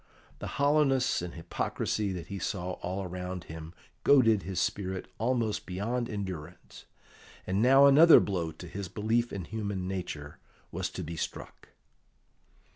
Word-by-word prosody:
The -, -, -6 dB
hollowness 140 Hz, -, +3 dB
and 90 Hz, -1 st, -6 dB
hypocrisy 100 Hz, +4 st, -2 dB
that 90 Hz, -3 st, -5 dB
he 100 Hz, -1 st, -6 dB
saw 90 Hz, -2 st, -3 dB
all 95 Hz, +2 st, -3 dB
around 90 Hz, 0 st, -5 dB
him 80 Hz, 0 st, -9 dB, 0.3 s
goaded 115 Hz, -7 st, +5 dB
his 95 Hz, -1 st, -3 dB
spirit 95 Hz, +1 st, -2 dB
almost 115 Hz, -2 st, 0 dB
beyond 115 Hz, +6 st, -2 dB
endurance, 95 Hz, -7 st, -7 dB, 0.6 s
and 95 Hz, +3 st, 0 dB
now 135 Hz, +3 st, +7 dB
another 155 Hz, +4 st, +9 dB
blow 85 Hz, -5 st, -1 dB
to 85 Hz, +3 st, -10 dB
his 100 Hz, +3 st, -5 dB
belief 115 Hz, +5 st, 0 dB
in 95 Hz, -4 st, -5 dB
human 100 Hz, -3 st, -3 dB
nature 85 Hz, -6 st, -5 dB, 0.3 s
was -, -, -2 dB
to -, -, -6 dB
be 85 Hz, +1 st, -6 dB
struck. -, -, -6 dB
100 Hz, 140 wpm, -30 LUFS, 90-115 Hz, 0.6 s, another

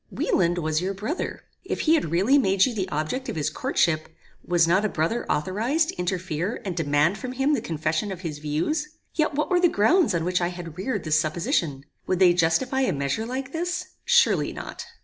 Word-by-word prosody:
"Wieland 175 Hz, -, +1 dB
was 155 Hz, -1 st, 0 dB
your 195 Hz, +2 st, -2 dB
brother. 220 Hz, -, -4 dB, 0.2 s
If -, -, -3 dB
he 315 Hz, -, +3 dB
had 310 Hz, -, +1 dB
really 200 Hz, -, +4 dB
made 195 Hz, -5 st, +3 dB
you 255 Hz, -, -2 dB
the 190 Hz, -4 st, -2 dB
object 155 Hz, -, -3 dB
of -, -, -4 dB
his 150 Hz, -2 st, -1 dB
courtship, 155 Hz, -2 st, 0 dB, 0.3 s
was 175 Hz, -2 st, +3 dB
not 190 Hz, +4 st, +3 dB
a 215 Hz, -, +1 dB
brother 170 Hz, +9 st, -1 dB
authorized 225 Hz, -, 0 dB
to -, -, -6 dB
interfere 180 Hz, +1 st, -2 dB
and 185 Hz, -3 st, -3 dB
demand 155 Hz, +4 st, +1 dB
from 255 Hz, -1 st, -5 dB
him 270 Hz, +3 st, +1 dB
the 270 Hz, -, +1 dB
confession 160 Hz, +2 st, -2 dB
of 185 Hz, -2 st, -6 dB
his 155 Hz, -5 st, -5 dB
views? 295 Hz, -, -2 dB, 0.2 s
Yet 310 Hz, -2 st, 0 dB
what 300 Hz, +5 st, -1 dB
were 360 Hz, -, +4 dB
the 350 Hz, -1 st, +4 dB
grounds 310 Hz, -, +3 dB
on 165 Hz, -1 st, -1 dB
which 180 Hz, 0 st, +1 dB
I 175 Hz, -, +2 dB
had 175 Hz, -3 st, -7 dB
reared 210 Hz, 0 st, -2 dB
this 155 Hz, -1 st, +2 dB
supposition? 155 Hz, -3 st, -1 dB, 0.2 s
Would 185 Hz, -, +1 dB
they 180 Hz, -1 st, +6 dB
justify 180 Hz, +11 st, +1 dB
a 260 Hz, -, +2 dB
measure 140 Hz, +10 st, -2 dB
like 260 Hz, +2 st, -4 dB
this? 345 Hz, +3 st, -3 dB
Surely 480 Hz, 0 st, +3 dB
not. -, -, -8 dB
185 Hz, 205 wpm, -25 LUFS, 165-265 Hz, 0.3 s, they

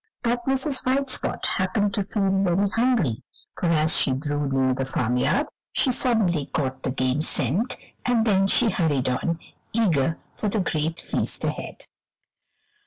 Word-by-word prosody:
But 240 Hz, +1 st, -1 dB
Mrs. 270 Hz, 0 st, +1 dB
White 270 Hz, +1 st, +1 dB
Spot -, -, -1 dB
happened 200 Hz, +2 st, 0 dB
to 215 Hz, -, +1 dB
feel 200 Hz, 0 st, -1 dB
very 195 Hz, 0 st, +2 dB
hungry, 225 Hz, -, +1 dB, 0.3 s
for 175 Hz, -, -2 dB
as 160 Hz, -1 st, +3 dB
she 135 Hz, -, +4 dB
drew 145 Hz, +1 st, -2 dB
near 130 Hz, -1 st, +2 dB
the 135 Hz, -, -2 dB
farmyard 125 Hz, -, +1 dB, 0.3 s
she 260 Hz, -, +3 dB
suddenly 210 Hz, -, +2 dB
caught 130 Hz, -3 st, -3 dB
the -, -, -2 dB
game 130 Hz, +2 st, 0 dB
scent, 165 Hz, -, 0 dB, 0.3 s
and 240 Hz, -2 st, +2 dB
then 195 Hz, -3 st, +3 dB
she 225 Hz, +2 st, +4 dB
hurried 145 Hz, -8 st, 0 dB
on, 160 Hz, +6 st, -1 dB, 0.4 s
eager 165 Hz, -9 st, +1 dB, 0.2 s
for 210 Hz, -, -2 dB
the 215 Hz, -, -1 dB
great 160 Hz, -2 st, -1 dB
feast -, -, 0 dB
ahead. -, -, -4 dB
180 Hz, 155 wpm, -24 LUFS, 140-230 Hz, 0.4 s, she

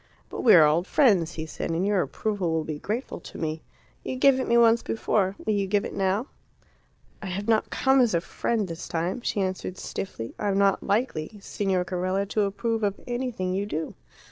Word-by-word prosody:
"But -, -, -5 dB
we 230 Hz, -, +7 dB
are 160 Hz, -3 st, +8 dB
old 165 Hz, +5 st, +2 dB
friends," 195 Hz, -, +3 dB
he 160 Hz, -, -5 dB
said, 160 Hz, -, -5 dB
"and 165 Hz, +3 st, 0 dB
your 200 Hz, -2 st, +2 dB
approval 185 Hz, +5 st, -2 dB
will 160 Hz, -1 st, 0 dB
be 155 Hz, -1 st, -5 dB
grateful 225 Hz, -, -4 dB
to -, -, -11 dB
me. 160 Hz, 0 st, -3 dB, 0.4 s
You -, -, -4 dB
gave 265 Hz, 0 st, +4 dB
it 260 Hz, -, -2 dB
me 235 Hz, -, +4 dB
once 230 Hz, 0 st, +5 dB
before. 200 Hz, -3 st, 0 dB
Will 215 Hz, -, +1 dB
you 200 Hz, -1 st, 0 dB
give 200 Hz, +1 st, +1 dB
it -, -, -6 dB
now?" 195 Hz, +4 st, 0 dB, 1.0 s
"I 200 Hz, -, -5 dB
have 195 Hz, +3 st, -4 dB
not 220 Hz, -1 st, +2 dB
come 265 Hz, 0 st, +3 dB
as 235 Hz, -7 st, +2 dB
a 170 Hz, -, +2 dB
friend 215 Hz, +3 st, -2 dB
this 165 Hz, -1 st, -7 dB
time," 175 Hz, +7 st, -2 dB
she 205 Hz, -, -1 dB
answered 185 Hz, -1 st, -3 dB
stiffly. 115 Hz, -, -6 dB
"I 210 Hz, -, -1 dB
am 195 Hz, -1 st, +1 dB
not 200 Hz, -1 st, +3 dB
likely, 205 Hz, -4 st, -1 dB
Signor 190 Hz, -2 st, -1 dB
Carella, 185 Hz, +2 st, -1 dB
to 215 Hz, -, +1 dB
approve 225 Hz, +3 st, -2 dB
of 200 Hz, -2 st, -1 dB
anything 240 Hz, -7 st, -2 dB
you 200 Hz, +2 st, -1 dB
do." 160 Hz, -5 st, -3 dB
195 Hz, 210 wpm, -26 LUFS, 180-220 Hz, 1.0 s, are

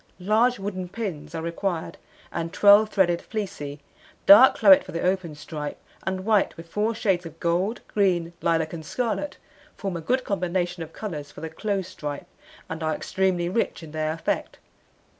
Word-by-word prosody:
Large 220 Hz, +6 st, +3 dB
wooden 190 Hz, -2 st, -4 dB
pins 190 Hz, -7 st, -5 dB
are 160 Hz, -, -3 dB
required, 170 Hz, 0 st, -3 dB, 0.3 s
and 165 Hz, -1 st, -3 dB
12 205 Hz, +3 st, +6 dB
threaded 175 Hz, -5 st, +2 dB
fleecy, 150 Hz, -9 st, -5 dB, 0.4 s
dark 225 Hz, +7 st, +9 dB
claret 285 Hz, -1 st, +7 dB
for -, -, -10 dB
the 170 Hz, -, -2 dB
open 180 Hz, -4 st, 0 dB
stripe, 150 Hz, 0 st, -6 dB, 0.2 s
and 190 Hz, 0 st, -3 dB
white, 210 Hz, -6 st, +2 dB
with 165 Hz, 0 st, -10 dB
4 210 Hz, +6 st, -1 dB
shades 190 Hz, -5 st, +1 dB
of 165 Hz, 0 st, -14 dB
gold, 180 Hz, +7 st, 0 dB
green, 175 Hz, -5 st, +1 dB
lilac, 165 Hz, -1 st, +1 dB
and 160 Hz, -2 st, -6 dB
scarlet, 245 Hz, -, -2 dB, 0.4 s
form 195 Hz, -4 st, -3 dB
a 170 Hz, -, -4 dB
good 255 Hz, +10 st, 0 dB
combination 180 Hz, -2 st, -1 dB
of 165 Hz, -1 st, -6 dB
colours 155 Hz, -10 st, -6 dB
for -, -, -11 dB
the 160 Hz, -, -4 dB
close 195 Hz, +1 st, -2 dB
stripe, 150 Hz, -5 st, -6 dB, 0.4 s
and 160 Hz, +1 st, -6 dB
are 155 Hz, -1 st, 0 dB
extremely 185 Hz, -2 st, 0 dB
rich 185 Hz, -2 st, -1 dB
in 155 Hz, -, -10 dB
their 155 Hz, 0 st, -1 dB
effect. 160 Hz, 0 st, -2 dB
180 Hz, 170 wpm, -25 LUFS, 165-205 Hz, 0.4 s, dark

